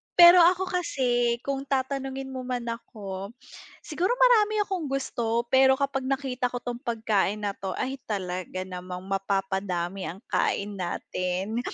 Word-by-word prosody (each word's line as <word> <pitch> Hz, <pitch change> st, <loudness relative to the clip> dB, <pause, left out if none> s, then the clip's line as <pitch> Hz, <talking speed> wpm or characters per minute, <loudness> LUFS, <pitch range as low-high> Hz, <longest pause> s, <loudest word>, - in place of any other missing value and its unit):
Pero 350 Hz, +1 st, +10 dB
ako 360 Hz, +2 st, +5 dB
kasi, 245 Hz, -9 st, +1 dB
kung 275 Hz, 0 st, -3 dB
tatanungin 270 Hz, 0 st, -2 dB
mo 260 Hz, -, -5 dB
man 250 Hz, -1 st, -2 dB
ako, 205 Hz, -3 st, -6 dB, 0.5 s
siguro 355 Hz, +8 st, 0 dB
marami 435 Hz, -4 st, +4 dB
akong 380 Hz, -5 st, -3 dB
gusto, 235 Hz, -4 st, -1 dB
pero 265 Hz, 0 st, +6 dB
kapag 275 Hz, -1 st, -1 dB
nakita 265 Hz, -2 st, -1 dB
ko 245 Hz, 0 st, -5 dB
'tong 240 Hz, 0 st, -4 dB
pagkain 220 Hz, -5 st, 0 dB
na 200 Hz, -, 0 dB
'to, 195 Hz, -, -4 dB
ay, 265 Hz, +1 st, -3 dB
talaga 185 Hz, -2 st, -3 dB
namang 180 Hz, 0 st, -7 dB
mapapadami 195 Hz, -1 st, -2 dB
ang 190 Hz, +5 st, -7 dB
kain 200 Hz, 0 st, 0 dB
natin, 185 Hz, +4 st, -2 dB
240 Hz, 140 wpm, -27 LUFS, 195-275 Hz, 0.5 s, Pero